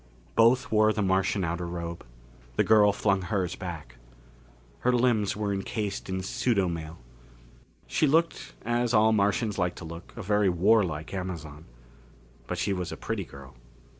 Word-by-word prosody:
Both 120 +3 +4
wore 110 0 +4
the 105 -1 -1
Martian 95 +1 +1
outer 85 +1 -3
robe. 85 0 -5 0.5
The - - +3
girl 105 -2 +5
flung 100 -1 +1
hers 95 -1 -2
back. 80 -9 -7 0.8
Her 125 - +2
limbs 120 -5 +2
were 105 -1 -1
encased 100 +1 -3
in 95 0 -2
pseudomail. 95 -9 -1 0.9
She 155 - +1
looked, 165 +4 +1
as 120 0 +1
all 110 +1 +5
Martians 105 0 +1
like 90 -1 0
to 90 - -9
look, 85 +1 -9
a 115 - -5
very 105 0 +2
warlike 90 -3 +2
Amazon. 85 -5 -6 0.8
But - - -3
she 100 - 0
was 90 -3 -3
a - - -6
pretty - - -3
girl. 70 0 -13
95 Hz, 150 wpm, -27 LUFS, 85-110 Hz, 0.9 s, girl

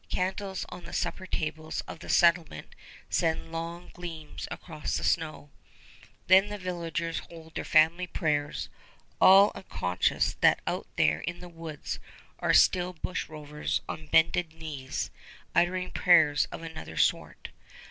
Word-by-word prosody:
Candles 190 0 -2
on 180 0 -9
the - - -10
supper 185 - -2
tables 155 -1 -3
of - - -10
the - - -10
settlement 170 - +2 0.3
send 165 0 0
long 170 +1 -6
gleams 165 -3 -7
across 155 -3 -4
the - - -4
snow. 155 -3 -1 0.7
Then 190 +2 +6
the 205 - -4
villagers 170 -3 -3
hold 160 -1 -12
their - - -3
family 165 +3 +4
prayers, 150 -4 -1 0.5
all 195 +2 +8
unconscious 90 - 0
that - - +5
out - - -3
there 75 0 +3
in 170 - -5
the 180 - -9
woods 165 -3 -6 0.4
are - - -2
the 180 0 +4
bushrovers 150 -4 -3
on 155 0 -6
bended 160 +1 +3
knees, 150 -5 -5 0.4
uttering 180 +1 +1
prayers 155 -5 +5
of 165 - -9
another 160 - -8
sort. - - 0
165 Hz, 135 wpm, -29 LUFS, 155-180 Hz, 0.7 s, all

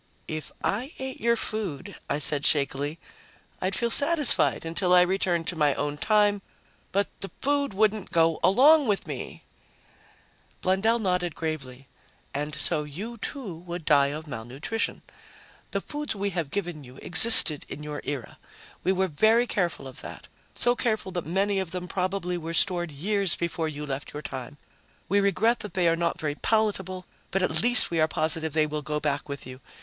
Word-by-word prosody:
"If 155 -1 -6
I 250 +9 -2
ate 265 0 -6
your 235 +1 +3
food," 200 -5 -5
I - - 0
said 150 -1 0
shakily, 145 +1 0 0.6
"I'd 190 +1 -1
feel 235 +2 -1
satisfied 295 - +3
until 180 +2 +2
I 180 - +7
was - - -5
returned 180 -3 0
to 180 - -4
my 150 -3 +2
own 145 0 -2
time. 205 +1 +2 0.5
But 200 +1 +1
the 195 - -3
food 280 -5 0
wouldn't 215 -1 +1
go 165 -2 +2
along 285 +8 +6
with 205 -2 0
me!" - - -7 1.2
Blundell 195 +5 +2
nodded 180 -6 -1
gravely. 135 -5 -5 0.5
"And 150 +1 -3
so 150 +1 -1
you, 200 +11 -7
too, 230 - -3
would 170 0 -8
die 140 -2 +4
of 150 +3 -5
malnutrition. 135 - -4 0.7
The - - -2
foods 295 -4 -5
we 200 0 -2
have 170 -5 -3
given 175 -4 -4
you 125 0 -14
existed 175 -5 +8
in 150 - -7
your 150 -1 -6
era. 140 -5 -6 0.4
We 185 - +2
were 190 0 +1
very 220 +9 +3
careful 175 - -2
of 130 - -10
that, - - -9 0.3
so 245 0 +2
careful 220 -6 -1
that 175 -4 -4
many 195 +3 0
of 190 -3 -3
them 180 +1 -5
probably 180 -1 -2
were 165 +1 -5
stored 175 -3 +1
years 195 +5 0
before 170 -1 -2
you 150 -1 -6
left 140 0 -6
your 150 +1 -7
time. 130 +2 -7 0.5
We 200 +3 +2
regret 200 +4 +2
that 210 -5 -8
they 180 -2 +2
are 165 - +3
not 170 0 -1
very 150 -2 -2
palatable, 190 -1 -1 0.2
but 195 0 0
at - - +1
least 245 -4 +5
we 165 -2 +1
are 155 - +4
positive 160 -1 -2
they 155 -1 +3
will 150 0 -4
go 150 +1 -3
back 145 -1 -2
with 140 0 -6
you. 130 +1 -10
175 Hz, 180 wpm, -26 LUFS, 150-205 Hz, 1.2 s, existed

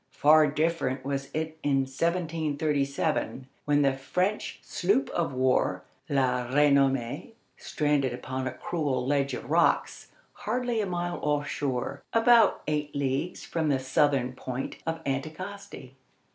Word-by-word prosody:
Far 155 +1 +6
different 150 -3 -1
was 140 0 -3
it 160 0 -4
in 140 -2 +2
1737, 150 -2 -1 0.2
when 145 0 +3
the 135 -1 +3
French 180 +10 -2
sloop 200 +9 0
of 170 -4 -1
war 130 -8 +1 0.3
La 130 -3 +1
Renommée 135 - +2 0.2
stranded 145 -3 0
upon 130 +1 -4
a - - -2
cruel 135 -4 -2
ledge 140 0 +1
of - - -8
rocks, - - +1 0.2
hardly 240 0 -1
a 205 - -2
mile 175 -1 -3
off 145 -1 0
shore, 140 0 -3
about 230 0 +5
eight 150 -1 -2
leagues 140 +5 -2
from 160 -2 -1
the 140 - +3
southern 130 -1 +1
point 130 0 -5
of 165 0 -3
Anticosti. 155 +1 -5
145 Hz, 130 wpm, -28 LUFS, 135-165 Hz, 0.3 s, Far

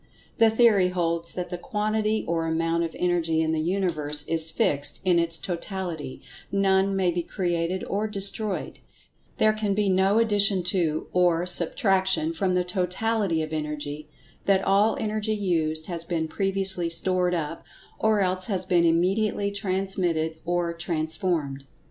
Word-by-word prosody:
The 225 -1 +6
theory 220 -4 +4
holds 170 -2 -2
that 180 -1 -4
the 180 - -4
quantity 215 0 -1
or 165 -1 -1
amount 165 +1 0
of 165 -1 -5
Energy 170 -2 +1
in 160 - 0
the 160 -1 0
Universe 155 -5 -1
is 165 -1 +1
fixed 145 -2 0
in 180 -2 +4
its 165 -1 0
totality—none 190 +2 -2
may 185 -2 +2
be 175 +1 -1
created 175 0 -2
or 205 +2 -2
destroyed—there 210 +1 -2
can 210 -2 -1
be 205 -1 +1
no 190 +2 +3
addition 205 -4 +3
to, 170 -4 0
or 175 -1 +2
subtraction 185 -1 +1
from 185 +2 0
the 180 - +2
Totality 185 0 0
of 155 0 -6
Energy—that 150 +5 -3
all 205 +3 +3
Energy 215 0 -1
used 160 -6 0
has 170 -2 -5
been 165 -2 -2
previously 190 -1 0
stored 180 +1 +1
up, 165 -1 -4 0.4
or 215 -1 +2
else 185 0 0
has 190 -3 -1
been 175 -2 +3
immediately 195 +5 +1
transmitted 185 -5 -2
or 175 0 -1
transformed. 160 -4 -2
180 Hz, 140 wpm, -25 LUFS, 165-195 Hz, 0.4 s, The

